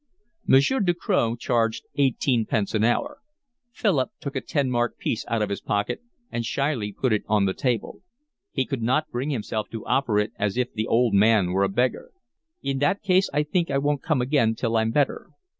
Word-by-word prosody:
Monsieur 140 - +4
Ducroz 175 - +1
charged 115 -1 0
eighteen 130 -3 +1
pence 105 -3 -1
an 110 -1 +1
hour. 285 - 0 0.5
Philip 175 - +1
took 140 0 -6
a 130 - -1
ten 140 -3 -1
mark 120 0 0
piece 115 - -2
out 115 -2 0
of 105 - -3
his 100 - -3
pocket 105 - -1 0.3
and 120 - -2
shyly 120 -3 -1
put 125 +3 0
it 105 - +1
on 105 -2 +3
the 95 - 0
table. 120 -2 -2 0.5
He - - 0
could 135 -5 -4
not 130 +7 0
bring 125 +4 -2
himself 110 -5 -3
to 115 -2 -7
offer 125 -6 +1
it 105 +1 0
as 105 +1 -1
if 125 -1 -1
the 110 +1 -2
old 120 -2 +2
man 100 -2 +4
were 95 +2 +1
a 100 - +2
beggar. 125 +5 -1 0.5
"In 135 -1 -1
that 145 +9 +1
case 185 -1 +3
I 150 - +1
think 170 +3 -1
I 140 - +1
won't 145 0 0
come 155 -7 +1
again 125 -4 +2
till 115 0 -1
I'm 110 0 +2
better." 140 +4 0
120 Hz, 200 wpm, -24 LUFS, 110-145 Hz, 0.5 s, Monsieur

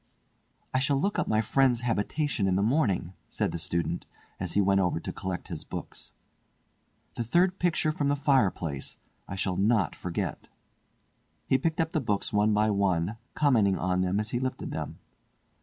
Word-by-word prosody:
"I 130 - +3
shall 140 0 +2
look 200 +7 0
up - - 0
my 110 0 +2
friend's 125 +1 +2
habitation 120 0 0
in 95 - +2
the 100 - +2
morning," 105 - +1 0.2
said - - -1
the 85 - -4
student, 85 0 -2 0.3
as - - -2
he - - +2
went 100 0 +4
over 90 -2 +1
to - - -5
collect 95 -2 -5
his 80 -3 -5
books. - - -8 1.0
"The 120 - -2
third 180 - +2
picture 165 -3 +2
from 145 -2 -1
the 145 - +2
fireplace; 100 - 0 0.3
I 100 - -5
shall 95 -1 -1
not 105 -4 +2
forget." 90 -2 -4 1.0
He 130 - +2
picked 165 +5 -1
up 165 0 +1
the 155 - 0
books 105 -5 -1
one 105 +1 +3
by 105 +1 +3
one, 100 0 +1 0.2
commenting 115 -10 +3
on 90 0 0
them 95 +2 +1
as 105 0 -1
he 120 - 0
lifted 130 0 -3
them. - - -5
105 Hz, 175 wpm, -28 LUFS, 95-135 Hz, 1.0 s, went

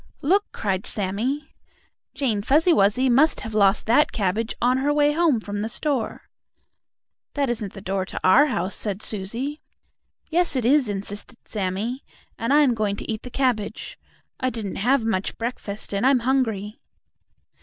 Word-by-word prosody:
"Look!" 390 +8 +3
cried 195 -2 -2
Sammie. 220 +9 -1 0.6
"Jane 235 -8 0
Fuzzy 305 - +3
Wuzzy 210 +3 +3
must 275 +6 +3
have 220 - -6
lost 200 -2 +3
that 245 +7 +3
cabbage 215 +2 -1
on 250 +2 +2
her 285 +2 +1
way 295 0 +3
home 310 -5 +2
from 205 -1 -5
the 220 - -2
store!" 265 -1 -1 1.1
"That 280 -3 +1
isn't 215 -5 -4
the 195 - -9
door 190 0 -1
to - - -5
our 265 +11 +6
house," 190 -7 -1
said 205 -1 -2
Susie. 235 +9 -3 0.7
"Yes 340 -2 +1
it 250 -3 0
is," 265 -2 +3
insisted 205 +3 -4
Sammie, 210 +6 -3 0.3
"and 230 +3 -2
I 295 +1 +6
am 260 -4 +3
going 210 -3 -1
to - - -5
eat 215 - -4
the 250 - -9
cabbage. 245 -5 -2 0.4
I 255 - 0
didn't 220 -6 -5
have 245 +3 +2
much 195 -4 -1
breakfast, 220 -4 -5
and 200 +2 -1
I'm 260 -1 +4
hungry." 225 -5 -1
230 Hz, 165 wpm, -23 LUFS, 205-275 Hz, 1.1 s, our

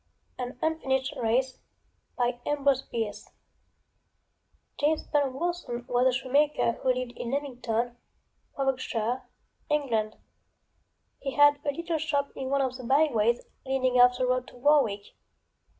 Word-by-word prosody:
AN 250 0 -5
UNFINISHED 265 -5 0
RACE 250 +3 +1 0.6
JAMES 250 +4 -1 2.5
BURNE 285 -3 +2
WORSON 330 -7 -3
was 245 +1 +3
a - - +4
shoemaker 270 +1 +2
who 255 +2 0
lived 255 -1 -3
in 235 - -5
Leamington, 245 -3 -2 0.6
Warwickshire, 255 -3 -1 0.5
England. 230 -8 0 1.0
He 275 -1 -4
had 290 0 +6
a 290 - 0
little 335 +2 -3
shop 285 -2 -1
in 260 -1 -4
one 280 0 +2
of 260 -1 -1
the 255 - -9
by 280 +6 +4
ways 235 +1 +1 0.2
leading 260 -2 +2
off 245 0 +6
the 255 - +1
road 255 0 0
to - - -14
Warwick. 245 -7 +2
260 Hz, 120 wpm, -28 LUFS, 245-285 Hz, 2.5 s, had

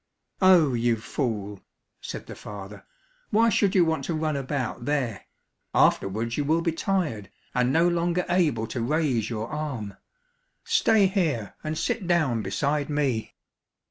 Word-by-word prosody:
"Oh, 175 -7 +6
you 120 0 +2
fool," 105 -4 -3 0.4
said - - -6
the - - -8
father, 100 0 -9 0.4
"why 230 +2 +4
should 200 -2 +2
you 180 -3 +5
want 160 -3 -1
to 170 - -2
run 155 -1 -1
about 130 -3 -3
there? 130 -8 -1 0.5
Afterwards 110 +4 +2
you 145 - +1
will 160 +3 +1
be 165 - +1
tired, 160 - -1 0.2
and 125 +1 +2
no 165 +4 +4
longer 175 +1 0
able 155 -11 +1
to 115 +2 -4
raise 130 -4 0
your 110 -1 -3
arm; 130 -10 -4 0.7
stay 220 -3 +4
here, 160 - 0
and 155 0 -3
sit 190 +2 -2
down 155 -10 +2
beside 145 +8 -1
me." 140 -7 -1
145 Hz, 145 wpm, -26 LUFS, 115-170 Hz, 0.7 s, Oh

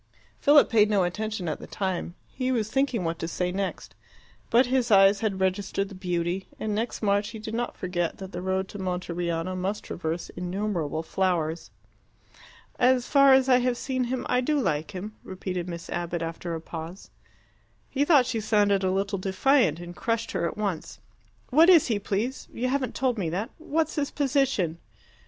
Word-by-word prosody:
Philip 290 0 +6
paid 215 -2 +4
no 200 -3 +3
attention 210 +1 -3
at 155 - -2
the - - -9
time: 185 -3 -3 0.2
he 255 0 -1
was 220 -4 -1
thinking 270 -6 +1
what 165 0 -2
to 165 - -3
say 180 +1 -2
next. 195 +1 -4 0.6
But 240 +3 +5
his 250 -1 +1
eyes 195 -1 +6
had 205 -4 -1
registered 195 +1 -1
the - - -10
beauty, 180 0 -2
and 215 -1 -2
next 225 +2 -3
March 205 0 +2
he 225 - -8
did 220 +1 -7
not 240 +1 -3
forget 175 -2 -2
that 190 -1 -8
the 175 - -5
road 190 +1 -1
to 205 - -8
Monteriano 175 -1 -2
must 190 +3 -2
traverse 165 0 -4
innumerable 180 -4 -2
flowers. 170 -2 -1 1.1
"As 250 -1 +4
far 275 -1 +6
as 265 0 +5
I 250 -1 +5
have 245 -1 0
seen 255 -1 -1
him, 255 +1 -3
I 250 - +2
do 295 +3 +1
like 155 - -1
him," 210 +2 -7
repeated 185 -1 -4
Miss 170 -1 -6
Abbott, 170 -1 -2
after 165 +1 -4
a 160 - -5
pause. 165 +3 -8 0.8
He 280 - 0
thought 290 -4 +5
she 240 -2 -2
sounded 205 -2 +2
a 190 - +2
little 195 +1 -1
defiant, 190 - +2
and 175 0 -8
crushed 230 0 -1
her 170 - 0
at - - -6
once. 200 -6 -3 0.5
"What 320 +7 +6
is 340 -5 +7
he, 215 -3 +1
please? 210 +6 -2
You 250 +2 -2
haven't 265 -1 -1
told 250 -4 0
me 175 -4 -1
that. 190 +7 -3
What's 315 0 -1
his 285 -1 0
position?" 265 - 0
200 Hz, 185 wpm, -26 LUFS, 180-245 Hz, 1.1 s, is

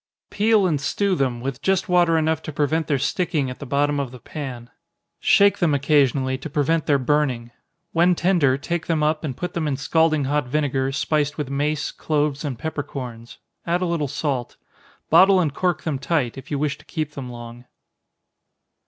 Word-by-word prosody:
_ - - -70
Peel 210 -1 +3
and 155 -6 0
stew 200 +6 0
them, 130 -7 -1
with 135 +1 -4
just 190 +5 +1
water 175 -2 +3
enough 160 0 +1
to 155 - -6
prevent 155 +2 0
their 145 - +1
sticking 145 -1 -1
at 125 - -9
the 140 - -7
bottom 145 +2 +1
of 140 -3 -2
the 125 - -11
pan. 125 -3 -7 0.5
Shake 200 0 +4
them 160 -5 +2
occasionally, 135 -2 +2
to 160 - -7
prevent 155 +2 0
their 145 -2 +4
burning. 130 -3 0 0.4
When 175 +2 +3
tender, 170 -8 +2
take 170 +4 -3
them 160 -2 +1
up, 155 +1 +1
and 135 -5 -4
put 180 - -4
them 165 -3 -1
in 140 -2 -1
scalding 155 +1 +2
hot 145 -1 0
vinegar, 135 -1 0
spiced 145 +1 0
with 145 -3 -4
mace, 150 +2 -1
cloves, 150 -1 -1
and 140 -5 -3
peppercorns 130 -5 -6 0.3
add 175 +2 +1
a - - +1
little 170 -4 -1
salt. 135 -3 -3 0.5
Bottle 190 0 +7
and 155 -6 0
cork 180 +3 -1
them 150 -5 -2
tight, 140 -4 0
if 135 +1 -10
you 145 - -1
wish 145 0 -1
to - - -18
keep 155 -3 -3
them 135 -3 -7
long. 120 0 -10
145 Hz, 190 wpm, -22 LUFS, 135-160 Hz, 0.5 s, Bottle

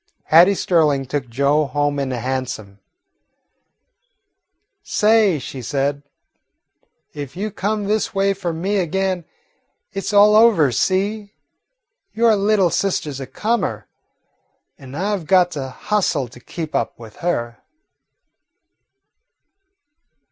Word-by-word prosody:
Hattie 175 +5 +6
Sterling 150 -7 +2
took 135 -1 -4
Joe 140 +5 +1
home 145 +1 -1
in 135 -1 -2
a 125 - -2
hansom. 125 -5 -4 2.0
"Say," 210 -5 +3
she 130 -1 -7
said, 140 +3 -1 1.1
"if 145 +2 -8
you 210 +2 -3
come 210 +2 -2
this 210 +2 0
way 195 0 +1
for 185 -3 -4
me 185 +6 -2
again, 185 0 -1 0.7
it 195 -1 -4
's - - -3
all 210 +1 +6
over, 215 - +5
see? 200 - -1 0.8
Your 225 -1 +4
little 200 -3 +2
sister 180 -6 -1
's 135 - -7
a 135 - -6
comer, 230 +4 -2 0.9
and 135 0 -11
I 205 +4 0
've 170 -6 -8
got 180 -2 +4
to 135 -4 -5
hustle 160 -4 -1
to 125 - -14
keep 160 +4 -7
up - - -2
with 115 -2 -13
her." 120 -9 -2
170 Hz, 120 wpm, -20 LUFS, 135-200 Hz, 2.0 s, Hattie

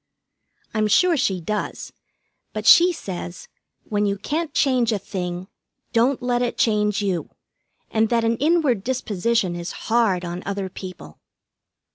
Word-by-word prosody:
I'm 215 -1 +1
sure 350 - +4
she 195 - 0
does, 210 +5 -4 0.6
but - - -4
she 350 +1 +8
says, 180 - -7 0.4
when 210 -1 0
you 200 0 -1
can't 310 - -2
change 255 -5 +2
a 215 - +1
thing, 180 -2 -5 0.5
don't 245 +3 +2
let 245 -1 +1
it 245 -1 -1
change 210 -2 +1
you, 185 -4 -1 0.6
and 220 0 +2
that 235 -1 +2
an 230 0 +1
inward 290 - +2
disposition 225 -5 0
is 175 0 -5 0.2
hard 200 -7 +2
on 175 +1 -5
other 200 -1 -3
people. 185 - -10
215 Hz, 140 wpm, -22 LUFS, 190-245 Hz, 0.6 s, she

